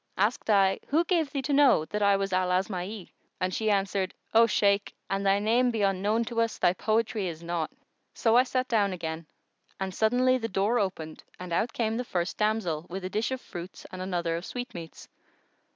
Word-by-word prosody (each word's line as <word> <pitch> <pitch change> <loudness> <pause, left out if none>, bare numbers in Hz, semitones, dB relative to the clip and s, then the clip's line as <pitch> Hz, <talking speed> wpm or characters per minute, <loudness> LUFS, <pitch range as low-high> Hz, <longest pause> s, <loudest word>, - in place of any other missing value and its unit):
Asked 215 +4 0
I, 195 -2 +4
'Who 315 +4 +3
gave 335 -4 +1
thee 275 -1 -3
to 285 - -1
know 275 - +5
that 210 +5 -4
I 200 -1 +4
was 195 -1 -2
Al 185 0 +2
Asma'i?' 185 +1 -2 0.3
and 185 0 -1
she 220 -1 0
answered, 195 -2 0 0.2
'O 230 +1 +6
Shaykh, 200 -2 +2 0.2
an 195 0 0
thy 195 0 +3
name 230 +5 +2
be 225 -3 -1
unknown 200 +4 +1
to 230 0 -1
us, 230 -1 -1
thy 175 - +3
poetry 215 0 0
is 165 -1 -6
not!' 170 -2 -2 0.5
So 225 0 +2
I 245 - +8
sat 255 0 -1
down 205 -5 +2
again 165 -2 -5 0.5
and 190 -1 -3
suddently 250 +5 +3
the 225 - -2
door 205 +5 +1
opened 165 -6 -4 0.2
and 180 -1 -6
out 225 +7 +1
came 225 -1 -1
the 250 - -1
first 180 -4 -3
damsel, 210 -7 0
with 185 +1 -5
a 185 - -4
dish 215 +3 0
of 260 -1 -4
fruits 175 0 -9
and 185 - -7
another 175 -3 -1
of 170 - -4
sweetmeats. 185 -10 -7
200 Hz, 200 wpm, -28 LUFS, 185-230 Hz, 0.5 s, I